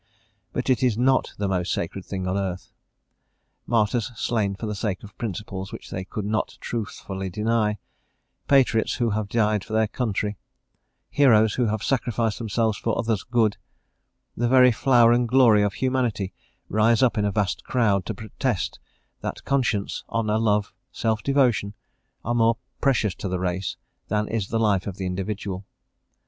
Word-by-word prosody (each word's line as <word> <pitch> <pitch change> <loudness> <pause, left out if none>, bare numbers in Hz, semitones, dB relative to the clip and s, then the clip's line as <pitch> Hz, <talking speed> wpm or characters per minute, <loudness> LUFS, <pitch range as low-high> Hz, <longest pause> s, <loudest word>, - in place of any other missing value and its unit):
But 125 - -3
it 130 - +2
is 125 -4 +2
not 130 +2 +2
the 100 - -1
most 90 -1 -1
sacred 90 +3 -3
thing 95 -1 -4
on 90 - 0
earth. 95 -2 -3 1.0
Martyrs 115 +1 +1
slain 105 -3 0
for 110 - -6
the 105 - -2
sake 100 -2 -3
of 105 0 -12
principles 100 -3 -5
which - - -9
they 95 0 -4
could 105 +1 -5
not 105 +1 -1
truthfully 95 -4 -4
deny; 105 +1 0 0.7
patriots 130 -5 +3
who 120 -3 0
have 105 -1 -2
died 105 -3 +1
for 110 - -8
their 110 0 +3
country; 105 -3 -2 0.7
heroes 110 -7 +5
who 125 -2 +1
have 110 -1 -2
sacrificed 120 -4 0
themselves 110 -1 0
for 115 - -1
others' 110 -4 0
good; 115 -4 +1 0.8
the 120 - 0
very 125 0 +6
flower 120 0 +5
and 120 0 +2
glory 120 -4 +6
of 105 -1 +1
humanity 120 -5 -1 0.3
rise 110 +4 +3
up 125 - +3
in 105 - +1
a - - +2
vast 100 -2 -1
crowd 105 -6 +1
to - - -3
protest 110 -1 -3 0.4
that - - -6
conscience, 120 -7 0
honour, 110 -1 0
love, 105 -2 +1 0.2
self 110 -2 -1
devotion, 120 -6 +2 0.5
are 120 - 0
more 115 -1 +3 0.2
precious 115 -8 +2
to 95 - -5
the 90 0 -1
race 95 +1 -2 0.3
than 105 0 0
is 110 -3 -1
the 115 - -1
life 105 -4 +2
of 95 -2 -5
the 95 - -3
individual. 95 +1 -3
110 Hz, 165 wpm, -24 LUFS, 100-120 Hz, 1.0 s, very